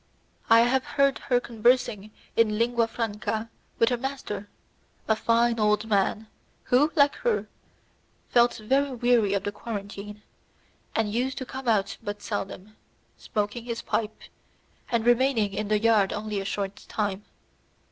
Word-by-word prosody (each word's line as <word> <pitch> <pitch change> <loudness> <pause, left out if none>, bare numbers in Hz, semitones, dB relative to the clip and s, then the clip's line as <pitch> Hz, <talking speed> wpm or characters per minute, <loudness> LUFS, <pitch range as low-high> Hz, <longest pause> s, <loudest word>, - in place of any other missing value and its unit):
I 230 0 +8
had 255 +2 +2
heard 275 0 +1
her 245 -1 +4
conversing 235 -3 +1 0.3
in 215 -2 +3
Lingua 235 0 +2
Franca 225 0 -3 0.3
with 230 - +4
her 245 - 0
master, 240 -6 -5 0.6
a 220 - +3
fine 230 +1 +2
old 210 0 +2
man, 210 +1 +1 0.4
who, 285 +5 +3
like 285 -2 +5
her, 480 -2 0 0.8
felt 240 0 +4
very 265 +4 0
weary 235 -4 +3
of 195 - -1
the 205 - -2
quarantine, 210 -1 -7 0.7
and 215 -2 0
used 255 +3 -1
to 260 - -4
come 260 0 -7
out 210 -4 +1
but 205 0 -6
seldom, 205 0 -5 0.4
smoking 210 +3 -3
his 235 -1 -4
pipe, 220 -1 -2 0.7
and 230 -1 +1
remaining 240 -4 +3
in 210 +1 -2
the 215 0 +2
yard 215 -3 +3
only 210 -1 -3
a - - -6
short 200 0 -3
time. 205 -2 -2
225 Hz, 145 wpm, -26 LUFS, 210-245 Hz, 0.8 s, I